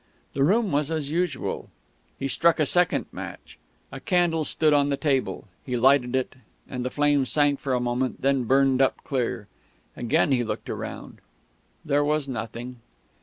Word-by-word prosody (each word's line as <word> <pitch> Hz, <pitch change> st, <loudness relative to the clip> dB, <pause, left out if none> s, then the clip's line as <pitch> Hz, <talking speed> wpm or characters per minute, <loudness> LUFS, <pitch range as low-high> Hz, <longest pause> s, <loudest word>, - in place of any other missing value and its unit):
The 135 Hz, -, +1 dB
room 205 Hz, +5 st, +2 dB
was 145 Hz, +1 st, +1 dB
as 155 Hz, -3 st, -3 dB
usual. 170 Hz, -3 st, -2 dB, 0.5 s
He 135 Hz, -, -2 dB
struck 165 Hz, +5 st, +3 dB
a 155 Hz, -, +3 dB
second 180 Hz, +4 st, +2 dB
match. -, -, -9 dB, 0.3 s
A -, -, -7 dB
candle 175 Hz, -5 st, +1 dB
stood 155 Hz, +1 st, +2 dB
on 145 Hz, -1 st, +3 dB
the 140 Hz, -, 0 dB
table. 135 Hz, -4 st, -1 dB, 0.2 s
He 125 Hz, -2 st, -2 dB
lighted 130 Hz, 0 st, +3 dB
it, 130 Hz, -1 st, -1 dB, 0.3 s
and 125 Hz, -1 st, -5 dB
the 125 Hz, -, -1 dB
flame 145 Hz, 0 st, +2 dB
sank 145 Hz, +1 st, +2 dB
for 135 Hz, -3 st, -1 dB
a -, -, +1 dB
moment 125 Hz, +1 st, -1 dB
and -, -, -23 dB
then 135 Hz, -1 st, +2 dB
burned 135 Hz, +1 st, +3 dB
up 135 Hz, -, +1 dB
clear. 120 Hz, -6 st, -2 dB, 0.5 s
Again 120 Hz, +4 st, +1 dB
he 125 Hz, -2 st, +2 dB
looked 110 Hz, -, -5 dB
round. -, -, -7 dB, 0.6 s
There 145 Hz, 0 st, +2 dB
was 150 Hz, -1 st, 0 dB
nothing. 120 Hz, 0 st, -6 dB
140 Hz, 170 wpm, -25 LUFS, 130-150 Hz, 0.6 s, struck